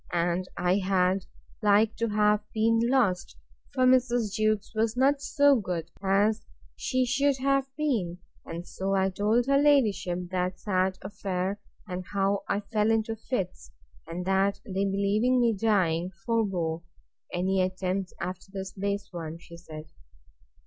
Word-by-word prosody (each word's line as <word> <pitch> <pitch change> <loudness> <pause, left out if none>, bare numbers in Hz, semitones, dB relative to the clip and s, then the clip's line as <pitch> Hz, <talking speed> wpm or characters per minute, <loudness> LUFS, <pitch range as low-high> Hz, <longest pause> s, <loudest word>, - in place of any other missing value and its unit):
and 175 +1 0
I 180 +2 +2
had 185 0 +1 0.4
like 210 +1 +4
to 230 - 0
have 210 0 +3 0.2
been 225 +1 +3
lost; 210 -10 +1 0.3
for 255 -2 +2
Mrs. 245 -4 +3
Jewkes 215 -1 0
was 220 +1 0
not 275 +2 +3
so 285 -1 +4
good 175 -5 -4
as 205 +3 +2 0.3
she 255 -1 0
should 275 +2 +2
have 275 0 +1
been. 225 - -1 0.3
And 170 +1 -7
so 195 +1 -2
I 190 0 +2
told 215 +5 +2
her 275 +1 +3
ladyship 200 -11 +2
that 185 0 -1
sad 185 -1 0
affair, 195 0 -3 0.3
and 185 -1 -4
how 200 0 +1
I 205 - 0
fell 210 +1 0
into 225 0 +1
fits; 190 - -4 0.4
and 175 +2 -5
that 195 +1 +2
they 195 0 -1
believing 200 +6 +2
me 235 -2 +3
dying, 185 -5 +1 0.2
forbore.—Any 180 -2 -2
attempts 185 0 -2
after 185 +2 -5
this 190 -1 -5
base 200 0 -2
one? 165 -2 -5
she 170 0 -13
said. 155 -2 -10
200 Hz, 140 wpm, -28 LUFS, 185-225 Hz, 0.4 s, like